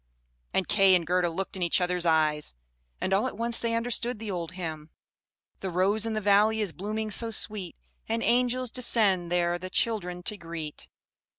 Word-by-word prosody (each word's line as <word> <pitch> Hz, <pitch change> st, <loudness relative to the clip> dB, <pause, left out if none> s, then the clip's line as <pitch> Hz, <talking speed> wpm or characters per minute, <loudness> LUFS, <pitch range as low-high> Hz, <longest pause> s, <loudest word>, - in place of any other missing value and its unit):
And 190 Hz, -, 0 dB
Kay 195 Hz, -2 st, +5 dB
and 175 Hz, -2 st, +1 dB
Gerda 180 Hz, +1 st, +1 dB
looked 190 Hz, +4 st, -4 dB
in 190 Hz, -, -6 dB
each 170 Hz, +1 st, +2 dB
other's 180 Hz, -1 st, 0 dB
eyes, 155 Hz, -, +1 dB, 0.4 s
and 190 Hz, -, -1 dB
all 210 Hz, +6 st, +2 dB
at 255 Hz, -, -7 dB
once 235 Hz, 0 st, +1 dB
they 230 Hz, -1 st, 0 dB
understood 240 Hz, +1 st, -1 dB
the 215 Hz, -1 st, -5 dB
old 175 Hz, -1 st, -4 dB
hymn: 160 Hz, -4 st, -6 dB, 0.7 s
"The 190 Hz, -, -4 dB
rose 195 Hz, +5 st, +2 dB
in 225 Hz, -, -2 dB
the 215 Hz, -, 0 dB
valley 210 Hz, +2 st, +4 dB
is 205 Hz, -6 st, -1 dB
blooming 215 Hz, +3 st, -3 dB
so 230 Hz, +3 st, +1 dB
sweet, 210 Hz, -5 st, -1 dB, 0.3 s
And 230 Hz, +1 st, 0 dB
angels 250 Hz, 0 st, +1 dB
descend 200 Hz, -8 st, +2 dB
there 175 Hz, 0 st, +1 dB
the 185 Hz, +1 st, -6 dB
children 180 Hz, -4 st, -1 dB
to 210 Hz, -, -1 dB
greet." 165 Hz, -4 st, -7 dB
195 Hz, 185 wpm, -28 LUFS, 175-220 Hz, 0.7 s, Kay